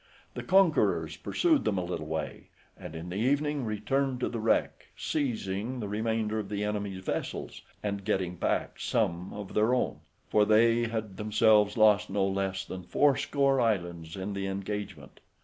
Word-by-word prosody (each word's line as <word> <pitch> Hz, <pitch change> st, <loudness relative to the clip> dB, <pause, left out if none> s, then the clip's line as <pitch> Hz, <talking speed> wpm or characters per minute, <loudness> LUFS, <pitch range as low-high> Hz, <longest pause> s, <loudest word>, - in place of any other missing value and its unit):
The -, -, -5 dB
conquerors 190 Hz, -3 st, +3 dB
pursued 320 Hz, -5 st, +1 dB
them 100 Hz, -, 0 dB
a 90 Hz, -, -1 dB
little 85 Hz, -3 st, -4 dB
way, 80 Hz, +1 st, -5 dB, 0.3 s
and 80 Hz, -, -9 dB
in 80 Hz, +2 st, -6 dB
the 90 Hz, -, -4 dB
evening 145 Hz, +4 st, +1 dB
returned 125 Hz, +5 st, -1 dB
to -, -, 0 dB
the 120 Hz, -, -4 dB
wreck, 110 Hz, +1 st, 0 dB
seizing 120 Hz, -4 st, -2 dB
the 105 Hz, -, -3 dB
remainder 110 Hz, +1 st, -1 dB
of 100 Hz, -2 st, -5 dB
the 105 Hz, 0 st, -2 dB
enemy's 100 Hz, -2 st, -3 dB
vessels, -, -, -4 dB, 0.2 s
and 100 Hz, -1 st, -2 dB
getting 95 Hz, -2 st, -1 dB
back -, -, -1 dB
some 85 Hz, +2 st, -1 dB
of 105 Hz, -2 st, -7 dB
their 110 Hz, +4 st, +3 dB
own, 125 Hz, -, -1 dB, 0.3 s
for 105 Hz, -, +4 dB
they 115 Hz, +2 st, +4 dB
had 110 Hz, -4 st, -4 dB
themselves 105 Hz, 0 st, +3 dB
lost 105 Hz, -1 st, +5 dB
no 95 Hz, 0 st, +1 dB
less 95 Hz, 0 st, -1 dB
than 95 Hz, -, -6 dB
fourscore 140 Hz, +3 st, +2 dB
islands 85 Hz, -7 st, -1 dB
in 95 Hz, +1 st, -4 dB
the 100 Hz, 0 st, -3 dB
engagement. 95 Hz, -6 st, -5 dB
105 Hz, 165 wpm, -29 LUFS, 95-115 Hz, 0.3 s, lost